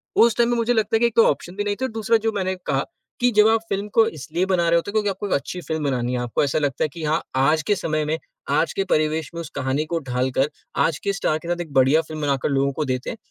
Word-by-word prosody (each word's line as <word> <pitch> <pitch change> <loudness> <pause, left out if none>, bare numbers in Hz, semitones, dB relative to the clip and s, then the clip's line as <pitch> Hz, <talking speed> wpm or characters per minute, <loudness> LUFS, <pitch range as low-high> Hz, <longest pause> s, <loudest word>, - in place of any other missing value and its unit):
उस 230 -1 +5
टाइम 235 0 +3
पे - - +2
मुझे 230 +1 +2
लगता 220 -1 +1
है - - +3
कि 235 - +3
एक 235 - -6
तो 230 - +6
ऑप्शन 175 +5 -2
भी 205 - -1
नहीं 205 0 -1
थे - - +2
और 260 - -4
दूसरा 225 +1 +2
जो - - +2
मैंने 190 0 -1
कहा, 135 -1 0 0.3
कि 245 0 +3
जब 210 0 +7
आप 225 0 +2
फ़िल्म 200 +1 -2
को 225 -1 +6
इसलिए 160 +6 -2
बना 175 -3 +2
रहे 170 - +4
होते 170 +4 -2
हो - - -18
क्योंकि 215 -2 +1
आपको 195 +1 -4
एक - - -1
अच्छी 180 +5 -2
फ़िल्म 160 -1 -3
बनानी 125 -3 -1
है 125 - -1
आपको 120 +2 0
ऐसा 140 +1 +1
लगता 145 -2 -1
है - - +2
कि 165 - -7
हाँ 155 +2 +1
आज 150 +4 +3
के 205 - +1
समय 155 -4 -1
में, 155 +2 -1 0.3
आज - - +1
के 390 - 0
परिवेश 155 0 +1
में - - -4
उस 165 - -8
कहानी 135 +2 -1
को 165 +1 -2
ढालकर, 130 +3 +1 0.3
आज 160 - +1
के 200 - -1
स्टार 155 -4 0
के 170 - -10
साथ 175 0 -1
एक 165 -4 -8
बढ़िया 135 +4 +4
फ़िल्म 155 -1 -7
बनाकर 140 -2 0
लोगों 140 0 +1
को 155 +2 -2
देते 130 0 -3
हैं, - - -6
160 Hz, 300 wpm, -22 LUFS, 140-205 Hz, 0.3 s, जब